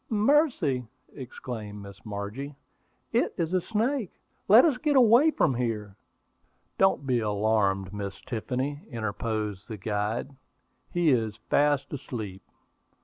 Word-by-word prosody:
"Mercy!" 215 - +2 0.3
exclaimed 110 -5 -7
Miss 100 -1 -12
Margie. 110 +7 -5 0.6
"It - - +1
is 165 +1 -1
a 185 - +3
snake! 225 +2 -1 0.4
Let 225 - +8
us 280 -6 +2
get 295 +1 +1
away 250 +4 +6
from 150 - +2
here!" 110 -5 -3 0.8
"Don't 190 -7 +3
be 125 -2 +2
alarmed, 105 -2 +1
Miss 100 -1 -5
Tiffany," 130 +5 -3
interposed 110 -2 -3
the 110 - -6
guide. 105 +7 -2 0.6
"He 175 -3 +3
is 110 -4 0
fast 145 -1 +2
asleep." 110 -9 -6
125 Hz, 120 wpm, -27 LUFS, 105-170 Hz, 0.8 s, Let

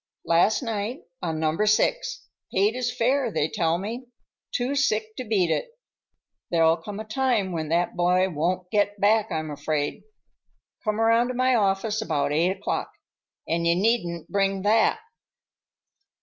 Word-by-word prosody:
"Last 175 +9 +3
night, 225 +2 -3 0.2
on 160 -2 -2
Number 160 +6 +1
Six. - - +1 0.3
Paid 200 +3 +2
his 245 0 -2
fare, 250 +1 +1
they 150 - 0
tell 165 +1 0
me. 230 +7 -6 0.4
Too 250 +3 -1
sick 220 -6 0
to 255 - -3
beat 200 -7 +1
it. - - -3 0.7
There'll 165 -1 +3
come 200 +5 -8
a - - -4
time 220 -4 0
when 160 -3 -3
that 170 +2 0
boy 180 +1 +3
won't 180 +2 -2
get 205 -1 +1
back, 215 +2 +3
I'm 155 -1 -3
afraid. 145 0 -2 0.8
Come 215 -1 -1
around 230 +1 +4
to 255 - -4
my 255 +1 +2
office 210 0 +1
about 145 -8 -1
eight 165 +4 +2
o'clock,—and 170 -2 -4
you 170 - +4
needn't 175 -5 0
bring 195 -1 0
that!" 220 - +3
205 Hz, 150 wpm, -25 LUFS, 170-230 Hz, 0.8 s, around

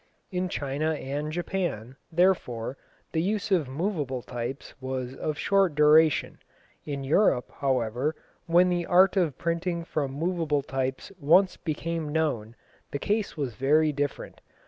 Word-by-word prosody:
In 180 0 -1
China 145 +1 -1
and 145 +1 -4
Japan, 170 - -3 0.2
therefore, 160 -9 +1 0.4
the 160 - 0
use 205 +3 -1
of 170 -7 +3
moveable 145 - -2
types 120 +3 -5
was 130 -1 -4
of 150 +2 -3
short 195 -4 +2
duration. 150 +1 +4 0.5
In 140 -2 -3
Europe, 135 -3 +2
however, 130 +2 0 0.3
when 175 +2 +5
the 175 -1 -1
art 185 +2 +5
of 170 -8 +1
printing 170 +1 -1
from 145 -5 -2
moveable 155 -1 0
types 130 +3 -3
once 180 +6 +4
became 165 0 -3
known, 125 -8 -1 0.3
the - - -3
case 205 +4 -1
was 135 -5 -2
very 150 +6 +3
different. 145 -1 -4
155 Hz, 135 wpm, -27 LUFS, 135-175 Hz, 0.5 s, when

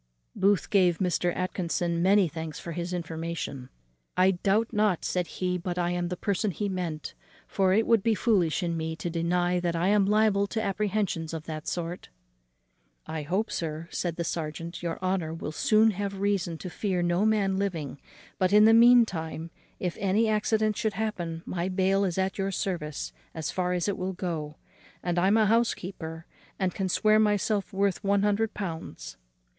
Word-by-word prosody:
Booth 200 -1 +2
gave 180 -4 +4
Mr. 180 -1 +1
Atkinson 175 -2 -1
many 195 +1 +5
thanks 160 -1 -6
for 170 - -7
his 175 +2 -4
information. 165 -6 -4 0.5
"I 185 +1 +5
doubt 200 +5 +1
not," 210 -5 +1
said 180 -2 -1
he, 180 -1 -2
"but 175 0 -4
I 175 0 0
am 175 0 -1
the 180 0 -4
person 200 +2 0 0.2
meant; 170 -4 -4 0.3
for 190 -2 +2
it 220 +4 +3
would 230 -3 +4
be 225 +2 +2
foolish 195 -7 +2
in 170 -1 -1
me 160 0 -3
to 170 +1 -4
deny 175 +2 +1
that 175 -1 -1
I 175 +3 +1
am 205 -1 +4
liable 210 -1 +3
to 220 - -3
apprehensions 195 -5 -1
of 160 - -5
that 155 -1 -6
sort." 175 0 -4 1.0
"I 160 -1 -4
hope, 190 +9 -1
sir," 160 0 -4
said 170 -2 -2
the 170 - -2
serjeant, 165 +1 -4
"your 170 -1 -3
honour 180 -4 -1
will 160 - -5
soon 215 +7 +4
have 200 0 -4
reason 195 -4 0
to 180 - -7
fear 185 -3 -1
no 175 +3 +1
man 205 -3 +2
living; 165 -9 -3 0.4
but 185 0 +2
in 210 +1 +7
the 225 - +7
mean 240 +1 +8
time, 160 -3 -5 0.3
if 180 -2 -2
any 205 +3 +2
accident 215 0 +1
should 220 -2 0
happen, 175 -6 -3
my 175 +1 -2
bail 190 +1 +2
is 180 -2 -2
at 190 +1 -1
your 195 0 0
service 150 - -3 0.2
as 160 -2 -3
far 180 -1 -1
as 175 0 0
it 200 - -1
will 185 +1 -2
go; 160 -5 -4 0.5
and 175 0 0
I 185 - +3
am 205 +3 +4
a 220 - +4
housekeeper, 185 -7 -1 0.3
and 185 -2 0
can 190 -1 -2
swear 215 +3 +4
myself 210 -1 +1
worth 195 -1 0
one 200 0 +2
hundred 210 +2 +1
pounds." 160 - -6
185 Hz, 185 wpm, -27 LUFS, 170-200 Hz, 1.0 s, mean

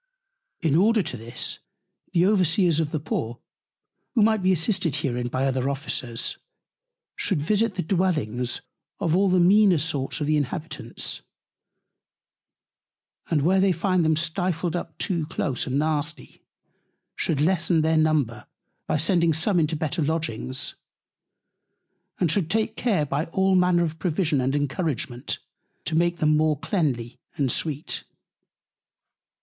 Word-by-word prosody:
In 160 -4 +2
order 215 +4 +4
to - - -4
this, 115 0 -4 0.5
the 175 0 +3
Overseers 180 -4 +3
of 160 -2 0
the 155 - -2
Poor 120 -4 -3 0.8
(who 225 - +5
might 220 -1 +3
be 185 0 +3
assisted 180 - +1
herein 120 -2 -1
by 130 +2 -1
other 130 0 0
Officers) 130 -4 -2 0.8
should 190 -7 0
visit 205 +6 +1
the 180 - -1
Dwellings 155 - -1 0.4
of 170 -4 +1
all 195 +1 +3
the 185 0 +3
meaner 190 +1 +5
sort 145 -2 -1
of 150 - -1
the 155 +1 +2
Inhabitants, 145 -2 -4 2.1
and 150 -4 +2
where 185 +4 +3
they 195 0 +4
find 180 +1 +1
them 160 0 +3
stifled 170 +1 -1
up 165 -3 -5
too 170 -6 -1
close 140 -5 -2
and 130 +1 0
nasty, 150 0 -2 0.7
should 150 - 0
lessen 170 0 +2
their 160 +1 +2
Number 155 -7 +1 0.4
by - - +1
sending 170 +1 +2
some 175 +4 +2
into 160 0 +1
better 155 +2 -2
Lodgings, 145 -5 -2 1.5
and 170 -4 +2
should 170 -3 0
take 220 +2 0
Care, 200 -13 +1
by 145 +3 -1
all 190 +3 +1
Manner 180 -1 +4
of 160 -1 -3
Provision 160 -5 +1
and 135 +2 0
Encouragement, 140 -3 -2 0.5
to 160 - -3
make 170 +2 +2
them 155 -1 +3
more 155 -1 +2
cleanly 135 - -2 0.2
and 135 -4 +1
sweet. 155 0 -2
160 Hz, 140 wpm, -25 LUFS, 145-180 Hz, 2.1 s, who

